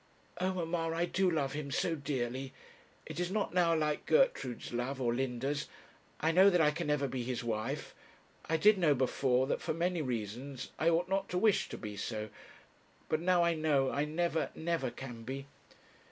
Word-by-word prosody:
Oh, 185 +1 +1
mamma, 165 -1 -1
I 170 +1 +1
do 190 +1 +1
love 145 -5 0
him 145 -1 -4
so 165 +4 0
dearly. 130 -2 -3 0.5
It - - -6
is 175 0 0
not 205 -1 -1
now 170 -2 +4
like 150 -1 -1
Gertrude's 465 - +2
love, 125 +3 -2
or 120 -2 +1
Linda's. 135 +3 -2 0.5
I 160 - +2
know 190 +4 +7
that 180 -2 +3
I 150 -2 +5
can 150 - -4
never 150 -1 +1
be 130 -1 -3
his 125 0 -3
wife. 110 -2 -3 0.6
I 160 - +3
did 205 +4 +5
know 155 -5 +4
before, 130 0 +2
that 135 - -1
for - - -2
many 175 0 0
reasons 125 +1 -4
I 160 - +4
ought 170 +2 +2
not 195 +1 -1
to 180 - -1
wish 210 +1 +3
to - - -6
be 105 -3 -7
so; 110 +1 -4 0.8
but 155 - +1
now 180 0 +4
I 170 0 +3
know 150 -4 +2
I 145 +1 0
never, 160 +1 0
never 170 -4 -1
can 120 -2 -8
be.' 135 +4 -5
150 Hz, 190 wpm, -33 LUFS, 130-170 Hz, 0.8 s, know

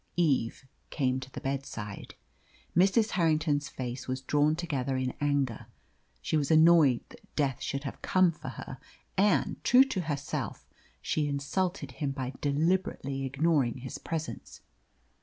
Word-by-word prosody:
Eve 135 -7 +1 0.2
came 130 -3 0
to 130 0 -9
the - - -6
bedside. 135 -7 -5 0.6
Mrs. 200 +5 +4
Harrington's 155 -4 +1
face 125 0 -5
was 130 0 -2
drawn 150 +3 +2
together 140 -6 -2
in 130 -1 -1
anger. 140 -5 0 0.6
She - - 0
was 145 -2 0
annoyed 160 -5 +6
that - - -18
Death 135 -4 0
should 140 0 -3
have 135 - -6
come 185 -2 +4
for 155 -4 -8
her, 130 0 -8 0.4
and, 190 -8 +2
true 250 +2 +7
to 260 -9 -2
herself, 145 -4 -4 0.4
she 150 -1 0
insulted 145 +2 -2
him 140 +2 -3
by 130 -1 -4
deliberately 145 -2 0
ignoring 135 -2 +1
his 130 +3 -7
presence. 160 -2 -5
145 Hz, 140 wpm, -29 LUFS, 130-165 Hz, 0.6 s, true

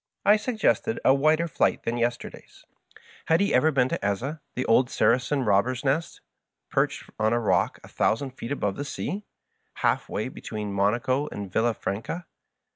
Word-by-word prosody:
I 205 - +7
suggested 225 0 0
a 130 - +7
wider 155 +4 +3
flight - - +1
than 115 - -1
yesterday's. 120 0 -4 0.6
Had 160 +1 +3
he 200 - +1
ever 150 +5 +4
been 130 -3 +2
to - - -3
Eza, 125 +10 -2
the 125 - -1
old 125 +3 +4
Saracen 130 +4 +2
robber 105 +5 +3
nest 145 +5 -1 0.5
perched - - 0
on 110 +1 +2
a 120 - +2
rock 115 - +1
a - - -11
thousand 130 +4 0
feet 125 0 -8
above 105 -8 -1
the 145 - -3
sea, 190 +7 -4 0.5
halfway - - 0
between 105 -2 -6
Monaco 120 +8 +1
and 100 -2 -6
ViUaf 115 +2 0
ranca 115 - -3
130 Hz, 160 wpm, -26 LUFS, 110-155 Hz, 0.6 s, I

